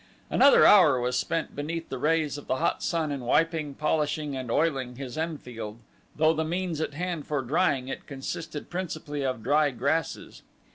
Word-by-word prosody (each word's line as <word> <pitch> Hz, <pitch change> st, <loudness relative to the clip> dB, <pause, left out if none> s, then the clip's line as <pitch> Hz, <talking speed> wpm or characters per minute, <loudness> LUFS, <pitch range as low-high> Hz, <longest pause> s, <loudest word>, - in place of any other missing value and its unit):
Another 280 Hz, -, +6 dB
hour 160 Hz, -11 st, +7 dB
was 125 Hz, +1 st, -1 dB
spent 165 Hz, +5 st, -2 dB
beneath 165 Hz, +3 st, -4 dB
the 130 Hz, -, -4 dB
rays 155 Hz, +1 st, +1 dB
of -, -, -14 dB
the -, -, +1 dB
hot 130 Hz, -, 0 dB
sun 160 Hz, -3 st, -1 dB
in 140 Hz, -, -3 dB
wiping, 155 Hz, +3 st, +1 dB
polishing, 150 Hz, -1 st, -1 dB
and 130 Hz, -2 st, -5 dB
oiling 135 Hz, -3 st, 0 dB
his 130 Hz, -1 st, -7 dB
Enfield 125 Hz, -9 st, -5 dB, 0.4 s
though 155 Hz, +1 st, +4 dB
the 160 Hz, 0 st, -1 dB
means 170 Hz, -1 st, -2 dB
at 145 Hz, -, -3 dB
hand 175 Hz, -2 st, -3 dB
for 145 Hz, -3 st, -1 dB
drying 135 Hz, -1 st, +1 dB
it 135 Hz, -, -6 dB
consisted 150 Hz, +3 st, -6 dB
principally 155 Hz, -5 st, -4 dB
of 130 Hz, -4 st, -2 dB
dry 145 Hz, +4 st, +3 dB
grasses. 140 Hz, +6 st, -2 dB
150 Hz, 175 wpm, -27 LUFS, 135-165 Hz, 0.4 s, hour